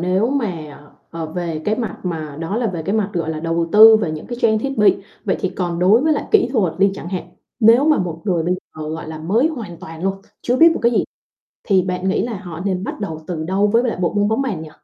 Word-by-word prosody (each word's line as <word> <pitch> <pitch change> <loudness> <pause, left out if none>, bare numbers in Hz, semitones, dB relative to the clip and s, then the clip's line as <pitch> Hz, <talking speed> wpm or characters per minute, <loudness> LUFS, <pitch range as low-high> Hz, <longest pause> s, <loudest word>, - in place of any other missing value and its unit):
nếu 185 +6 +1
mà, 180 - -3 0.3
ờ, 165 -1 -5
về 165 -1 -4
cái 210 - +1
mặt 230 -2 -4
mà 155 -5 -4
đó 165 +6 -3
là 240 0 0
về 175 -6 -3
cái 195 +6 -2
mặt, 210 -2 0
gọi 165 -3 -2
là, 155 -1 -4
đầu 165 0 -1
tư 220 +1 +9
về 200 -7 -1
những 155 -1 -6
cái 240 -1 -6
trang 220 -1 +3
thiết 270 +2 -4
bị, 210 - +5 0.3
vậy 190 - 0
thì 190 - 0
còn 175 -2 -3
đối 195 +6 +5
với 310 +3 +2
lại 295 - -1
kỹ 430 - +4
thuật 200 - +1
đi 195 0 +4
chẳng 175 - -7
hạn, 180 -2 -5 0.3
nếu 230 +5 +6
mà 310 -1 +4
một 170 -3 -3
người 180 -5 +1
bây 175 +3 0
giờ, 155 -4 -9
gọi 160 0 -6
là, 160 0 -6
mới 210 - +1
hoàn 225 - -7
toàn 160 0 -10
luôn, 195 0 0 0.3
chưa 245 - +1
biết 330 +4 +7
một - - -4
cái 235 - +3
gì - - +2 0.6
thì 190 -3 +4
bạn 180 +1 -2
nghĩ 190 - +1
là 230 -3 -4
họ 175 -4 -8
nên 190 -1 -1
bắt - - -6
đầu 160 -6 -5
từ 160 -3 -4
đâu 190 +4 +1
với 230 +3 +3
lại 245 -2 -1
bộ 175 - 0
môn 205 0 +2
bóng 220 +5 +1
bàn 205 -12 -3
nhỉ? 155 - -10
190 Hz, 270 wpm, -19 LUFS, 165-220 Hz, 0.6 s, tư